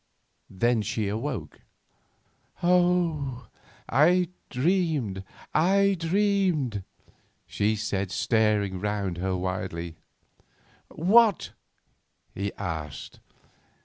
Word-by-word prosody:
Then 115 Hz, +4 st, +1 dB
she 105 Hz, -1 st, -2 dB
woke. 125 Hz, +2 st, -4 dB, 1.0 s
"Oh, 170 Hz, -8 st, +1 dB, 0.4 s
I 175 Hz, +5 st, +4 dB, 0.2 s
dreamed, 140 Hz, -, 0 dB, 0.3 s
I 195 Hz, +5 st, +3 dB
dreamed!" 175 Hz, -, +1 dB, 0.6 s
she 105 Hz, +2 st, 0 dB
said, 100 Hz, -3 st, -2 dB
staring 105 Hz, -3 st, +1 dB
round 100 Hz, -3 st, -2 dB
her 95 Hz, 0 st, -1 dB
wildly. 90 Hz, -2 st, -4 dB, 0.9 s
"What?" 210 Hz, +4 st, +3 dB, 0.8 s
he 100 Hz, 0 st, -3 dB
asked. 80 Hz, -6 st, -6 dB
115 Hz, 75 wpm, -26 LUFS, -, 1.0 s, I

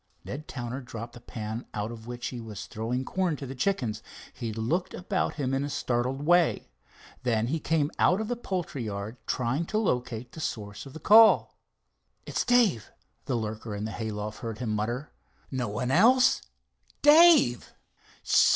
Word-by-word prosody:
Ned 150 Hz, +3 st, -6 dB
Towner 125 Hz, +1 st, -5 dB
dropped 120 Hz, -1 st, -8 dB
the 120 Hz, -, -12 dB
pan 110 Hz, 0 st, -6 dB
out 105 Hz, +2 st, -2 dB
of 115 Hz, -1 st, -10 dB
which 120 Hz, 0 st, -4 dB
he 125 Hz, -2 st, -6 dB
was 110 Hz, -3 st, -7 dB
throwing 120 Hz, +4 st, -3 dB
corn 185 Hz, -4 st, 0 dB
to 140 Hz, -, -7 dB
the 130 Hz, -, -6 dB
chickens. 125 Hz, -, -1 dB, 0.3 s
He 115 Hz, -2 st, -4 dB
looked 115 Hz, -, -2 dB
about 185 Hz, +1 st, -1 dB
him 135 Hz, -4 st, -2 dB
in 135 Hz, +1 st, 0 dB
a 145 Hz, -, -3 dB
startled 130 Hz, +1 st, -1 dB
way. 175 Hz, -, +3 dB, 0.5 s
Then 115 Hz, -3 st, +1 dB
he 160 Hz, +3 st, 0 dB
came 155 Hz, -1 st, 0 dB
out 185 Hz, +3 st, +4 dB
of 220 Hz, -, -2 dB
the 245 Hz, -, -1 dB
poultry 180 Hz, -, -4 dB
yard, 105 Hz, +3 st, -5 dB
trying 135 Hz, +7 st, -1 dB
to 215 Hz, -, -1 dB
locate 125 Hz, -, -1 dB
the -, -, -10 dB
source 105 Hz, -4 st, -5 dB
of 135 Hz, -, -12 dB
the 160 Hz, -, -8 dB
call. 220 Hz, +7 st, +6 dB, 0.7 s
"It's -, -, -1 dB
Dave," 230 Hz, -, +3 dB, 0.3 s
the 130 Hz, -, -1 dB
lurker 110 Hz, -1 st, -4 dB
in 105 Hz, +1 st, -4 dB
the 110 Hz, -, -4 dB
hay 110 Hz, 0 st, -4 dB
loft 105 Hz, 0 st, -5 dB
heard 115 Hz, -4 st, -5 dB
him 115 Hz, -1 st, -3 dB
mutter. 120 Hz, +7 st, -2 dB, 0.4 s
"No 130 Hz, -3 st, -1 dB
one 105 Hz, +5 st, -2 dB
else—Dave." 260 Hz, -, +4 dB
125 Hz, 170 wpm, -28 LUFS, 110-160 Hz, 0.7 s, call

